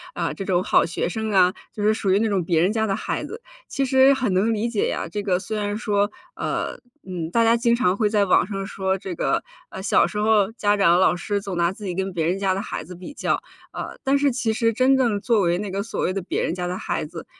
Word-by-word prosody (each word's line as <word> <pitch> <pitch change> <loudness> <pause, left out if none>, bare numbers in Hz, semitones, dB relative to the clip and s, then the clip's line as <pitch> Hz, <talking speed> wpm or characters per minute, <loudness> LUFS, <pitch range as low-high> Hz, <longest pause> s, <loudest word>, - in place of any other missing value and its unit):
啊， - - -2
这 195 - -6
种 185 -2 +1
好 - - +4
学 170 - -2
生 220 +5 -3
啊， 185 -2 +4 0.2
就 210 - -5
是 215 +1 +4
属 195 -3 -1
于 195 - +4
那 225 - +1
种 195 -4 0
别 165 -1 +1
人 185 +6 +2
家 220 -1 0
的 195 - 0
孩 - - -3
子。 450 - -7 0.3
其 275 - -1
实 265 +1 +5
很 255 -7 -1
能 200 +5 +2
理 220 +3 -1
解 225 -4 0
呀， - - -3
这 205 +5 -4
个 190 -3 +1
虽 215 +3 -5
然 205 0 -2
说， 205 -2 0 0.2
呃， - - -3 0.3
嗯， 175 -3 -4
大 230 +3 +3
家 230 +1 +4
经 235 0 +2
常 185 -6 +2
会 210 0 +1
在 205 -1 +2
网 180 -1 +3
上 195 -1 -4
说 190 -1 -1
这 190 -1 -6
个， 170 - 0 0.3
呃， 190 - -8
小 205 - +3
时 210 - -6
候 210 -1 +3
家 205 -3 +1
长 185 -4 +4
和 180 - +3
老 185 - +4
师 200 +3 -2
总 195 -2 -5
拿 170 0 +2
自 205 +2 -9
己 180 - -2
跟 190 +1 -2
别 165 -3 -1
人 180 +4 0
家 195 -1 +1
的 195 - -2
孩 - - -5
子 180 +4 -10
比 180 +10 -9
较， - - 0 0.4
啊， - - -5
但 275 +1 +3
是 280 -1 +2
其 240 -2 -1
实 230 +1 +1
真 260 +4 +4
正 235 -6 +1
作 230 -2 +2
为 175 -1 +2
那 205 +1 -4
个 195 +1 -2
所 225 - -4
谓 185 - 0
的 195 - -2
别 180 - -2
人 - - -1
家 180 -1 -3
的 180 - -3
孩 - - -3
子， 165 +1 -9
200 Hz, 295 characters per minute, -23 LUFS, 185-220 Hz, 0.4 s, 实